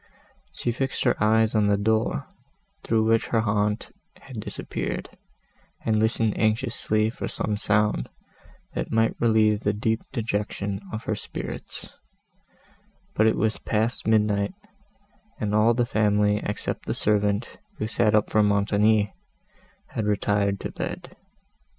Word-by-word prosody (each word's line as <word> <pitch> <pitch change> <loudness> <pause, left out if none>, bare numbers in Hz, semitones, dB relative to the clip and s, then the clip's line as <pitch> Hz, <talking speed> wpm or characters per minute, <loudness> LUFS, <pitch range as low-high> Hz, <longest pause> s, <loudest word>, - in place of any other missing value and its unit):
She 120 - -2
fixed 135 +3 -2
her 120 - +3
eyes 110 0 +3
on 105 -2 +3
the 100 0 +3
door, 110 - +1 0.6
through 110 -1 +1
which 115 0 +2
her 115 - +2
aunt 105 0 0 0.3
had - - -9
disappeared, - - -4 0.7
and 110 -1 +2
listened 110 -1 +1
anxiously 110 0 +1
for - - -5
some 105 - -2
sound, 105 - +1 0.6
that - - -3
might 115 0 +2
relieve 110 -2 +4
the 105 -1 0
deep 110 +2 0
dejection 105 -4 -2
of 110 0 -5
her - - -1
spirits; - - -6 1.2
but 110 - +3
it 110 - +3
was 110 +1 0
past 110 +2 -1
midnight, 105 - +2 0.8
and 105 -1 -1
all 110 +2 +4
the 120 0 +2
family 105 -2 +2
except 105 - -4
the - - -1
servant, 105 - 0 0.2
who - - -2
sat 110 0 +2
up 105 - +2
for 110 - +4
Montoni, 105 0 +3 0.8
had 110 -2 -2
retired 100 -1 +1
to - - -4
bed. - - -6
110 Hz, 135 wpm, -25 LUFS, 105-110 Hz, 1.2 s, relieve